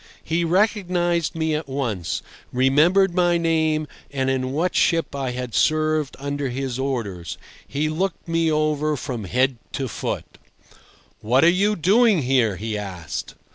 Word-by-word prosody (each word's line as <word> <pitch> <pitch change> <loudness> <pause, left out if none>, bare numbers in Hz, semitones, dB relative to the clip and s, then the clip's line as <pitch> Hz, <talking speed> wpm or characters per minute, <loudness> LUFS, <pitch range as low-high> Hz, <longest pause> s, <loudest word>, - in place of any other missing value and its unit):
He 165 +2 0
recognised 175 -3 +1
me 160 -1 0
at 150 -1 -3
once, 120 -11 -2 0.3
remembered 155 +9 +4
my 175 -1 +3
name, 160 -2 +1 0.2
and 135 -1 0
in 130 -1 -1
what 165 +6 0
ship 165 -4 +2
I 135 -2 -2
had 125 -1 -5
served 155 -2 +1
under 140 0 -3
his 130 0 -3
orders. 110 - -3 0.3
He 145 +3 -1
looked 175 +5 -2
me 165 -1 +1
over 155 0 +1
from 125 -6 -5
head 125 +6 +1 0.2
to 135 - -2
foot. - - -5 0.8
"What 125 +6 +3
are 165 - +7
you 200 +4 +2
doing 200 - +4
here?" 125 -5 +2
he 110 +4 -4
asked. 90 -6 -6
150 Hz, 145 wpm, -23 LUFS, 130-170 Hz, 0.8 s, are